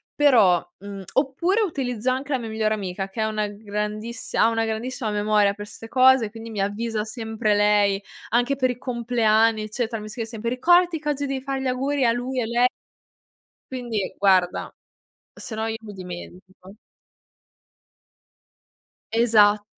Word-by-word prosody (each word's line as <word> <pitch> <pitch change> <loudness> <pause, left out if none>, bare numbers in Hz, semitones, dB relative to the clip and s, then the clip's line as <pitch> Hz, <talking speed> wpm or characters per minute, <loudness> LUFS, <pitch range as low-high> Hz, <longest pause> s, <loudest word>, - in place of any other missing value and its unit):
però 225 -13 +5
mhmm, 200 0 -8
oppure 320 +10 +1
utilizzo 260 - -1
anche 265 +3 -2
la 265 - +1
mia 230 -2 -6
migliore 220 0 0
amica 195 -1 -4
che 205 +3 -4
è - - +2
una 215 -1 -1
grandissi 210 +2 -5
ha - - +5
una 225 0 0
grandissima 225 +1 -3
memoria 210 -1 +2
per 205 0 -9
ste 225 +1 -10
cose, 255 -4 +5
quindi 225 0 -9
mi 210 -3 -3
avvisa 215 +2 -2
sempre 220 -1 -2
lei 205 -1 +3 0.3
anche 245 +4 +2
per 260 -1 +1
i 245 - -7
compleanni, 230 -3 +2
eccetera, 225 +1 -3
mi 215 - -8
scrive 225 +1 -4
sempre: 230 0 -4
"Ricordati 350 +6 +4
che 300 0 -3
oggi 285 -1 -1
devi 270 -1 -3
fare 270 -1 -3
gli 265 - -2
auguri 270 +2 0
a 230 - +4
lui 250 +2 -3
e - - -1
lei." 240 +2 +2 1.1
Quindi, 235 -6 -3
guarda, 185 -3 +2 0.6
sennò 220 -1 -5
io 225 0 -3
mi 210 -2 -10
dimentico. 185 +1 -10 2.4
Esatto. 210 -3 +4
225 Hz, 155 wpm, -23 LUFS, 210-255 Hz, 2.4 s, però